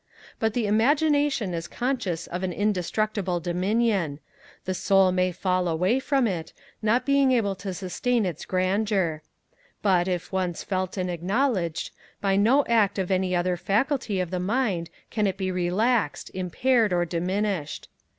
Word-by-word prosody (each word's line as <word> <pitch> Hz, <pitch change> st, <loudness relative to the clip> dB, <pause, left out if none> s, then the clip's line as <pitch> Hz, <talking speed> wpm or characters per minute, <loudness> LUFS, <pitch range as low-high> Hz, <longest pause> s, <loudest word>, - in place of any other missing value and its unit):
But 220 Hz, -1 st, 0 dB
the 240 Hz, -3 st, +1 dB
Imagination 280 Hz, -, +2 dB
is 170 Hz, 0 st, -4 dB
conscious 225 Hz, -10 st, -2 dB
of 180 Hz, +1 st, -5 dB
an 185 Hz, -1 st, -1 dB
indestructible 205 Hz, -1 st, -1 dB
dominion; 185 Hz, -2 st, 0 dB, 0.5 s
the 185 Hz, -, -1 dB
Soul 195 Hz, 0 st, +3 dB
may 185 Hz, 0 st, +1 dB
fall 185 Hz, 0 st, 0 dB
away 180 Hz, +9 st, +1 dB
from 270 Hz, -1 st, +1 dB
it, 175 Hz, -7 st, -3 dB, 0.3 s
not 230 Hz, +4 st, +2 dB
being 280 Hz, -1 st, +4 dB
able 210 Hz, -5 st, +1 dB
to 195 Hz, 0 st, -5 dB
sustain 205 Hz, +5 st, -1 dB
its 170 Hz, -4 st, -4 dB
grandeur; 185 Hz, -3 st, 0 dB, 0.6 s
but, 185 Hz, -3 st, +3 dB
if 180 Hz, -2 st, -3 dB
once 185 Hz, -3 st, -2 dB
felt 185 Hz, 0 st, -2 dB
and 180 Hz, -1 st, -1 dB
acknowledged, 180 Hz, -, -1 dB, 0.3 s
by 195 Hz, -1 st, +1 dB
no 240 Hz, +8 st, +4 dB
act 220 Hz, -4 st, +2 dB
of 190 Hz, -1 st, -1 dB
any 185 Hz, -1 st, +1 dB
other 180 Hz, +1 st, +1 dB
faculty 220 Hz, -, 0 dB
of 180 Hz, -2 st, -2 dB
the 180 Hz, -, -1 dB
mind 195 Hz, -4 st, 0 dB, 0.2 s
can 210 Hz, -2 st, +1 dB
it 190 Hz, 0 st, -2 dB
be 190 Hz, -1 st, -1 dB
relaxed, 185 Hz, +1 st, 0 dB
impaired, 215 Hz, +5 st, +1 dB
or 175 Hz, -1 st, +2 dB
diminished. 180 Hz, -1 st, -2 dB
190 Hz, 150 wpm, -25 LUFS, 180-225 Hz, 0.6 s, being